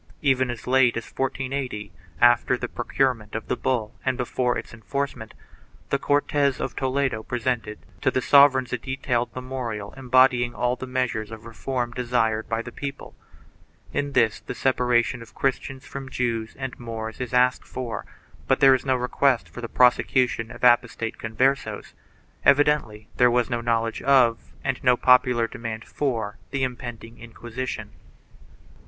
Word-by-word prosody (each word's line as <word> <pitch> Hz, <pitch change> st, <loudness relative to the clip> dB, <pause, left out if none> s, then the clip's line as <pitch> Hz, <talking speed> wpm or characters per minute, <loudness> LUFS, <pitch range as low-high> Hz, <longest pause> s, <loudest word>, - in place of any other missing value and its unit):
4 -, -, -33 dB
Even 130 Hz, -3 st, +2 dB
as 120 Hz, -2 st, -6 dB
late 125 Hz, -2 st, +3 dB
as 115 Hz, -, -4 dB
1480, 130 Hz, -6 st, -3 dB, 0.3 s
after 120 Hz, +1 st, +4 dB
the 125 Hz, -, -4 dB
pro 120 Hz, -, -6 dB
curement 125 Hz, -6 st, 0 dB
of 115 Hz, -, -4 dB
the -, -, +1 dB
bull 120 Hz, -4 st, -1 dB
and 130 Hz, -2 st, 0 dB
before 125 Hz, 0 st, 0 dB
its -, -, -7 dB
enforcement, 120 Hz, +1 st, -4 dB, 0.6 s
the 140 Hz, -, +2 dB
Cortes 145 Hz, -1 st, +1 dB
of -, -, -4 dB
Toledo 130 Hz, -3 st, 0 dB
presented 120 Hz, -2 st, -2 dB, 0.2 s
to -, -, +3 dB
the -, -, 0 dB
sovereigns 130 Hz, -2 st, +5 dB
a 125 Hz, -, -1 dB
detailed 125 Hz, -2 st, -2 dB
memorial 125 Hz, -5 st, -5 dB
embody 130 Hz, -1 st, +4 dB
ing 120 Hz, 0 st, -5 dB
all 125 Hz, +3 st, 0 dB
the 130 Hz, -, -7 dB
measures 125 Hz, -4 st, -2 dB
of 110 Hz, 0 st, -10 dB
reform 120 Hz, +1 st, -3 dB
desired 120 Hz, -3 st, 0 dB
by 115 Hz, 0 st, -1 dB
the 120 Hz, -, -8 dB
people. 140 Hz, +1 st, -7 dB, 0.8 s
In 145 Hz, 0 st, -2 dB
this 115 Hz, -4 st, +2 dB
the -, -, -7 dB
separation 125 Hz, -2 st, +1 dB
of 115 Hz, -, -14 dB
Christians 135 Hz, 0 st, -2 dB
from 135 Hz, -1 st, -7 dB
Jews 115 Hz, -4 st, -2 dB
and 130 Hz, -2 st, -6 dB
Moors 110 Hz, -1 st, -6 dB
is 125 Hz, -, -4 dB
asked 125 Hz, 0 st, +3 dB
for, 125 Hz, -3 st, -5 dB, 0.4 s
but 135 Hz, -, +2 dB
there 135 Hz, -2 st, +7 dB
is 130 Hz, -, 0 dB
no 130 Hz, -1 st, +1 dB
request 125 Hz, 0 st, +1 dB
for 120 Hz, -, -9 dB
the 115 Hz, -, -5 dB
prosecution 125 Hz, -2 st, +3 dB
of -, -, -11 dB
apostate 120 Hz, -2 st, +2 dB
Converses.5 130 Hz, +5 st, -1 dB, 0.5 s
Evidently 140 Hz, -7 st, +3 dB
there 125 Hz, -, +6 dB
was 120 Hz, +1 st, +1 dB
no 120 Hz, -1 st, -1 dB
knowledge 115 Hz, -1 st, 0 dB
of 130 Hz, -4 st, +3 dB
and 135 Hz, -2 st, -2 dB
no 125 Hz, -2 st, +4 dB
popular 125 Hz, -2 st, +4 dB
demand 115 Hz, -1 st, -6 dB
for 115 Hz, -7 st, -3 dB
the 140 Hz, -1 st, -2 dB
impending 120 Hz, -2 st, -6 dB
Inquisition. 120 Hz, +2 st, -6 dB
125 Hz, 160 wpm, -24 LUFS, 115-130 Hz, 0.8 s, there